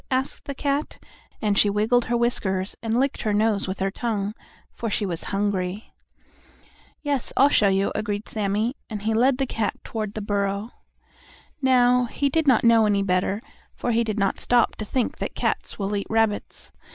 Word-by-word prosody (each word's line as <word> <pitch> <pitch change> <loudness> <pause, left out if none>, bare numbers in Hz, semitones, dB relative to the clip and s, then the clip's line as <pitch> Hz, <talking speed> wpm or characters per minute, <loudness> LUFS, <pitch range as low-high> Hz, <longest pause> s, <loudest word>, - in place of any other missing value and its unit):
asked 260 +1 -1
the 280 - -5
cat, 280 +2 -1 0.5
and 205 -1 +2
she 205 - +5
wiggled 220 +4 +2
her 240 +1 0
whiskers 195 -5 0
and 225 +1 0
licked 275 +1 0
her 215 -2 0
nose 210 -1 +1
with 190 +1 -3
her 195 0 -1
tongue, 210 -2 -2 0.4
for 230 - -4
she 205 - 0
was 175 -3 -4
hungry. 200 0 -2 1.1
"Yes, 285 -4 -1
I'll 275 +2 +6
show 210 -7 +4
you," 195 0 +2
agreed 205 0 -3
Sammie, 215 +4 -1
and 210 -3 -5
he 220 +1 +1
led 250 +4 +3
the 270 - 0
cat 220 -5 -2
toward 215 -2 -4
the - - -2
burrow. 200 +2 -1 0.9
Now, 250 -1 +4
he 280 +4 -1
did 320 +1 0
not 255 -5 +5
know 230 -2 +5
any 200 -1 +2
better, 190 +3 0 0.3
for 245 - -2
he 230 +1 +2
did 215 -2 -3
not 195 -2 0
stop 240 -1 +2
to 215 - -4
think 250 +2 -1
that - - -4
cats - - -2
will 205 0 -2
eat 200 - -3
rabbits. 220 -2 -1
215 Hz, 185 wpm, -24 LUFS, 200-245 Hz, 1.1 s, I'll